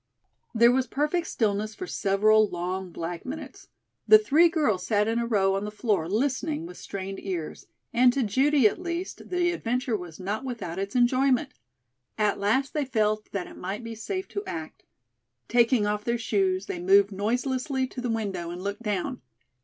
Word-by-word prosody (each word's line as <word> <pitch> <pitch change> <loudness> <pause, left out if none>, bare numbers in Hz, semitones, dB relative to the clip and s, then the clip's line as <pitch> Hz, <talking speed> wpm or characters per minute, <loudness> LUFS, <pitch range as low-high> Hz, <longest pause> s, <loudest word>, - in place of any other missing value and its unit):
There 235 +1 +6
was 260 0 +1
perfect 300 +7 -1
stillness 215 -1 -1
for 370 - -5
several 215 - +3
long 180 +2 -3
black 170 +1 -5
minutes. 290 +5 -8 0.4
The 435 - +10
three 345 -5 +4
girls 235 - +1
sat 210 +1 +1
in 225 +1 +1
a 235 - -1
row 195 -4 +2
on 195 +1 -1
the 210 - -3
floor 210 -6 -1
listening 285 - -1
with 355 - -10
strained 195 0 -6
ears 175 -5 -5 0.3
and 245 +1 +5
to 270 - +1
Judy 265 +4 +4
at 275 - -3
least 345 +1 -5
the 355 -1 +1
adventure 250 -5 -1
was 175 -4 -7
not 205 +6 -3
without 230 -9 -5
its 195 +3 -4
enjoyment. 255 +1 +2 0.6
At 210 -2 +1
last 225 +7 +1
they 300 - 0
felt 215 -4 0
that 195 -3 -3
it - - -12
might 195 +5 -5
be 230 0 -6
safe 375 - -4
to 405 - -4
act. 160 -1 -6 0.7
Taking 235 -2 +3
off 210 0 -1
their 235 +1 0
shoes 370 - 0
they 390 -3 -5
moved 390 - +4
noiselessly 255 +6 -1
to 255 0 -7
the 245 - -2
window 200 -7 -2
and 175 +1 -6
looked 200 +4 -4
down. 210 +3 -2
230 Hz, 180 wpm, -26 LUFS, 200-275 Hz, 0.7 s, The